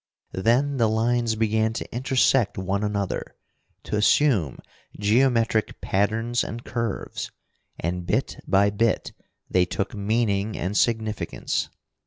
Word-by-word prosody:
Then 125 +8 +2
the 115 -3 +3
lines 115 +1 +1
began 110 0 +1
to - - -6
intersect 130 -3 +2
one 95 +2 -1
another, 100 -2 -2 0.5
to - - -3
assume 105 - +3 0.4
geometric 115 +1 +2
patterns 115 +4 0
and 120 +1 -6
curves. 115 -2 -3 0.5
And 90 +2 -2
bit - - 0
by 100 +1 +4
bit 115 +2 0 0.4
they 90 -1 +3
took 100 +3 -3
meaning 105 0 0
and 95 +4 -3
significance. 110 -1 0
110 Hz, 115 wpm, -24 LUFS, 100-115 Hz, 0.5 s, by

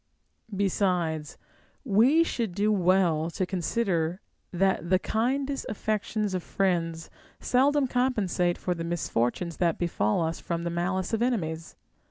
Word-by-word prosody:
Besides, 180 -6 0 0.5
we 255 +9 +5
should 230 - -3
do 210 +2 +2
well 180 -4 +2
to 185 +2 -2
consider 180 -2 -1 0.3
that 190 -1 +1
the 185 - +5
kindest 270 +8 -1
aifections 215 -1 -2
of 185 - -1
friends 165 -4 -1 0.3
seldom 280 +3 +3
compensate 215 -9 0
for 180 - -1
the 165 -1 -5
misfortunes 165 -1 -1
that 170 -3 +1
befall 165 -5 0
us 165 +1 -2
from 170 -1 -3
the 170 - -2
malice 180 +3 -1
of 225 - 0
enemies. 165 -10 -2
185 Hz, 130 wpm, -27 LUFS, 170-215 Hz, 0.5 s, we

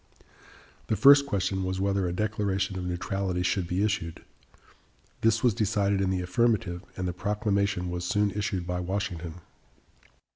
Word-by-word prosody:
The 110 - +1
first 140 +3 +7
question 95 -3 -1
was 95 0 -2
whether 100 -1 +1
a - - -2
declaration 100 -1 -1
of 90 -1 -4
neutrality 90 +1 -2
should 90 0 0
be 90 +3 0
issued. 100 -6 -2 1.0
This 115 0 +2
was 120 -3 +4
decided 100 -1 +1
in 95 - +1
the 95 -1 0
affirmative, 100 -2 0
and 90 -1 -2
the 90 - -2
proclamation 100 -1 0
was 90 0 -3
soon 100 +3 +1
issued 100 -3 -2
by 90 0 -2
Washington. 90 -3 -3
95 Hz, 150 wpm, -27 LUFS, 90-105 Hz, 1.0 s, first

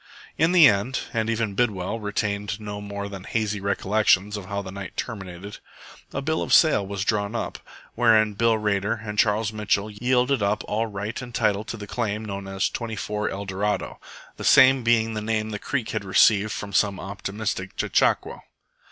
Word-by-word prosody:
In 160 +3 +2
the 175 -5 +8
end, 110 +5 +1
and 110 -1 0
even 115 -2 -1
Bidwell 105 -2 -1
retained 105 0 -2
no 105 -1 -6
more 100 0 -5
than 100 -2 -8
hazy 105 -1 -2
recollections 100 0 +2
of 100 -2 -6
how 100 0 -3
the 95 - -8
night 100 0 -8
terminated, 95 -2 -6 0.5
a - - -4
bill 160 +2 0
of - - -4
sale 155 -11 +5
was 100 0 -3
drawn 105 0 0
up, - - -4 0.3
wherein 110 -3 +4
Bill 115 +2 +2
Rader 105 +1 0
and 105 0 -4
Charles 110 0 +2
Mitchell 105 0 0
yielded 125 +3 +1
up 100 +1 0
all 110 +2 -1
right 105 +3 -5
and 120 -1 -9
title 105 -2 +1
to 115 - -6
the 105 - -7
claim 110 0 -3
known 100 -1 -6
as 95 0 0
24 105 -2 -3
ELDORADO, 100 +1 -3 0.4
the - - -7
same 130 0 +6
being 115 -1 +2
the 110 - -3
name 110 0 -1
the 105 - -4
creek 130 -1 -3
had 110 -2 -3
received 100 +2 +4
from 100 -1 -6
some 100 -1 +2
optimistic 100 0 -4
chechaquo. - - +1
105 Hz, 180 wpm, -24 LUFS, 100-115 Hz, 0.5 s, the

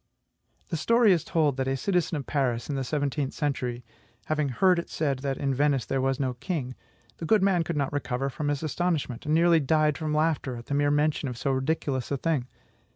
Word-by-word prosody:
The 165 - -1
story 230 +5 +4
is 165 -3 0
told, 150 -5 +1
that 135 0 -1
a 135 0 0
citizen 180 0 0
of 140 - -5
Paris 130 -3 -1
in - - -2
the 135 - -1
seventeenth 145 0 -2
century 125 -5 -2 0.4
having 150 -2 0
heard 180 +7 +3
it 170 - -6
said 140 -4 -1
that 135 -1 -2
in 135 -1 0
Venice 140 -1 +1
there 135 -1 -1
was 135 +1 0
no 130 -2 0
king, 130 -1 -4 0.4
the 165 - -5
good 210 +3 +3
man 185 -3 +3
could 165 -1 -3
not 140 -1 -1
recover 135 -2 -2
from 145 +2 -4
his 145 +1 -1
astonishment, 155 -5 -2
and 155 - +2
nearly 170 0 +5
died 155 +1 +2
from 155 -1 -2
laughter 155 -4 0
at 120 0 -9
the - - -4
mere 145 0 +2
mention 145 -1 +1
of 125 - -6
so 135 - -1
ridiculous 135 -1 -1
a 140 - -1
thing. 140 -4 -1
145 Hz, 220 wpm, -27 LUFS, 135-160 Hz, 0.4 s, nearly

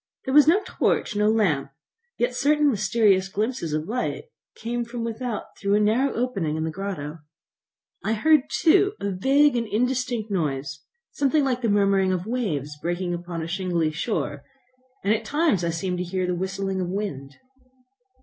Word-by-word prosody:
There 265 - -2
was 295 0 +7
no 350 +6 +6
torch, 210 - 0
no 210 +1 +3
lamp, 175 -12 +1 0.5
yet 245 +1 0
certain 295 +3 +3
mysterious 195 -2 +2
glimpses 210 -3 -2
of 155 +2 -2
light 250 - -3 0.3
came 240 +2 -3
from 235 0 -5
without 230 0 -4
through 200 0 +1
a - - +4
narrow 225 +6 +2
opening 200 -11 -1
in 160 - -1
the 160 - -2
grotto. 165 -4 -5 0.8
I 220 - 0
heard 300 +5 +3
too 390 +5 +3
a 200 - -2
vague 275 +9 +3
and 230 -1 -1
indistinct 245 -1 -1
noise, 145 -5 -2 0.3
something 285 +1 +2
like 255 -2 0
the 230 - +1
murmuring 195 -2 +3
of 185 -1 -2
waves 195 - -2
breaking 175 +1 -2
upon 175 -1 -5
a - - -4
shingly 175 -3 -1
shore, 150 - -3 0.6
and 200 +2 +3
at 220 +1 -1
times 290 - +1
I 170 - 0
seemed 180 +2 -2
to - - -1
hear 185 +1 -2
the 180 - -1
whistling 190 +1 -2
of 175 - -2
wind. 145 -9 -4
200 Hz, 170 wpm, -24 LUFS, 175-245 Hz, 0.8 s, was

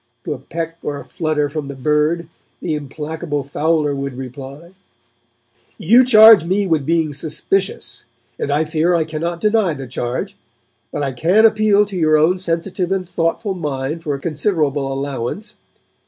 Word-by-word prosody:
To - - -3
a 135 - -8
peck 165 +4 -6
or 145 - -4
a - - -9
flutter 155 -3 -1
from 145 0 -5
the 140 - -7
bird 150 +4 0 0.3
the 165 - -2
implacable 150 +1 -4
fowler 150 +1 0
would 140 -2 -4
reply: 135 +5 -9 1.1
'You 230 +6 +5
charge 220 -5 +8
me 190 +4 0
with 160 -6 0
being 160 -2 +1
suspicious, 155 -2 -2 0.3
and - - -2
I 150 +3 +1
fear 160 +3 +1
I 165 - +2
cannot 165 +2 -4
deny 210 -6 +2
the 135 -1 -7
charge. 130 - -4 0.6
But - - -3
I 135 - -1
can 180 - +4
appeal 215 -2 +4
to 200 -1 -8
your 155 -3 +3
own 170 +5 +3
sensitive 180 +1 -2
and 190 -2 -1
thoughtful 175 +4 -1
mind 150 -2 -3
for 150 -4 -2
a - - -7
considerable 150 -4 -1
allowance. 140 - -4
160 Hz, 160 wpm, -19 LUFS, 145-180 Hz, 1.1 s, charge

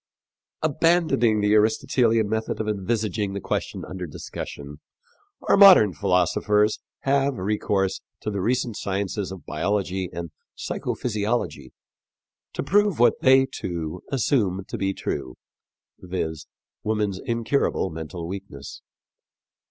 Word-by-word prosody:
" - - -67
Abandoning 155 -8 +3
the 105 0 +3
Aristotelian 115 +1 +3
method 110 +1 -2
of 110 - -2
envisaging 105 -1 -1
the 100 - -3
question - - -3
under 90 -1 -6
discussion, 75 -1 -8 0.7
our - - +5
modern 190 - +8
philosophers 105 +2 +2 0.2
have 140 0 +1
recourse 95 -1 0 0.2
to 105 - -3
the 100 -2 -2
recent 120 +1 0
sciences 100 0 -2
of 95 -2 -9
biology 95 +2 -1
and 85 -1 -6 0.2
psycho - - -3
physiology 105 - -2 0.8
to - - -3
prove 205 -2 +2
what 120 - +3
they, 130 0 +6
too, 85 -9 -5
assume 105 -8 +1
to - - -4
be 95 0 +1
true 70 -8 -4 0.6
viz., 80 -4 -4 0.3
woman's 105 -3 -1
incurable 115 - 0
mental 80 +1 -6
weakness. 95 -7 -8
105 Hz, 120 wpm, -24 LUFS, 90-115 Hz, 0.8 s, modern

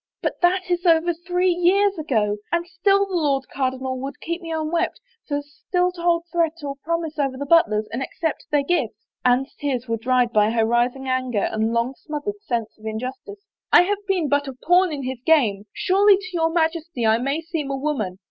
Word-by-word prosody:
But - - -2
that 365 +1 +3
is 350 -1 0
over 340 0 +4
three 360 +2 0
years 375 +2 +2
ago 215 -9 0
— - - -40
and 340 0 0
still 390 +3 +2
the 390 - -9
Lord 280 -5 +1
Cardinal 260 -1 -2
would 275 +2 -6
keep 340 +2 -4
me 330 -1 -7
unwed 320 +2 0 0.4
so 285 - -2
as 290 0 -8 0.2
still 360 0 +2
to 350 -1 -10
hold 340 -1 +2
threat 335 -2 +1
or 280 -1 -3
promise 325 -1 -2
over 270 -2 0
the 285 - -4
Butlers 245 -10 +3
and 240 - -2
accept 320 +3 -3
their 290 -1 +2
gifts." 260 - -1 0.2
Anne's 255 +2 +2
tears 260 -4 -3
were 230 0 -1
dried 245 0 +1
by 210 0 +4
her 225 0 +2
rising 245 +3 0
anger 255 -5 0
and 220 +1 0
long 235 +3 0
smothered 310 +9 -6
sense 235 - -3
of 215 - -15
injustice. 260 - -6 0.2
" - - -60
I - - +8
have 410 +2 -2
been 365 -6 +1
but 285 0 +1
a 270 - -5
pawn 355 +7 +3
in 285 -3 -4
his 255 -1 -5
game. 220 -11 +2
Surely 395 +1 +4
to 385 -1 -8
your 325 -1 +2
Majesty 325 -5 -1
I 220 +1 +4
may 275 +5 -1
seem 320 -4 -4
a 275 - -2
woman. 265 -11 -2
295 Hz, 215 wpm, -22 LUFS, 255-345 Hz, 0.4 s, I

